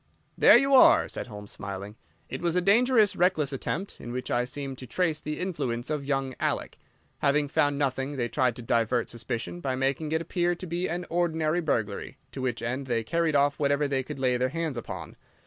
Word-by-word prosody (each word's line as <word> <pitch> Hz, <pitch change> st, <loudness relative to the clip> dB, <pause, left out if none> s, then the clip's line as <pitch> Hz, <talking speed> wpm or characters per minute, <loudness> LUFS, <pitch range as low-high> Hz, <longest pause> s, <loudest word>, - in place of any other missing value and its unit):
"There -, -, +8 dB
you 275 Hz, 0 st, +2 dB
are," 260 Hz, -, +7 dB
said -, -, -5 dB
Holmes, 105 Hz, -3 st, -8 dB
smiling. 100 Hz, +1 st, -6 dB, 0.3 s
"It -, -, -6 dB
was 170 Hz, -1 st, +1 dB
a -, -, +4 dB
dangerous, 220 Hz, +3 st, +4 dB
reckless 155 Hz, -6 st, +2 dB
attempt, 180 Hz, +8 st, -4 dB
in 120 Hz, -, -7 dB
which 125 Hz, +1 st, -4 dB
I 120 Hz, 0 st, +1 dB
seem 135 Hz, +1 st, -4 dB
to 130 Hz, -, -8 dB
trace 160 Hz, +2 st, 0 dB
the 150 Hz, 0 st, -4 dB
influence 140 Hz, -8 st, -2 dB
of 150 Hz, -2 st, -2 dB
young 135 Hz, -2 st, -1 dB
Alec. -, -, -2 dB, 0.4 s
Having 145 Hz, +1 st, +2 dB
found 145 Hz, -1 st, +2 dB
nothing 135 Hz, 0 st, -1 dB
they 120 Hz, -2 st, 0 dB
tried 125 Hz, 0 st, +1 dB
to 120 Hz, -, -8 dB
divert 115 Hz, +1 st, +1 dB
suspicion 115 Hz, -6 st, -4 dB
by 130 Hz, +8 st, -2 dB
making 135 Hz, +4 st, -1 dB
it 160 Hz, -, +2 dB
appear 175 Hz, +1 st, 0 dB
to 185 Hz, -, -7 dB
be 175 Hz, +1 st, -2 dB
an 175 Hz, +2 st, -3 dB
ordinary 165 Hz, -1 st, +1 dB
burglary, 110 Hz, -10 st, -2 dB
to 135 Hz, -, -6 dB
which 125 Hz, -3 st, -2 dB
end 130 Hz, +3 st, -3 dB
they 115 Hz, -2 st, 0 dB
carried 165 Hz, +3 st, 0 dB
off 140 Hz, 0 st, +2 dB
whatever 145 Hz, 0 st, +2 dB
they 135 Hz, -1 st, 0 dB
could 140 Hz, +2 st, -7 dB
lay 130 Hz, -2 st, +1 dB
their 130 Hz, +1 st, +1 dB
hands 165 Hz, -1 st, -3 dB
upon. 120 Hz, -, -7 dB
140 Hz, 205 wpm, -27 LUFS, 125-165 Hz, 0.4 s, There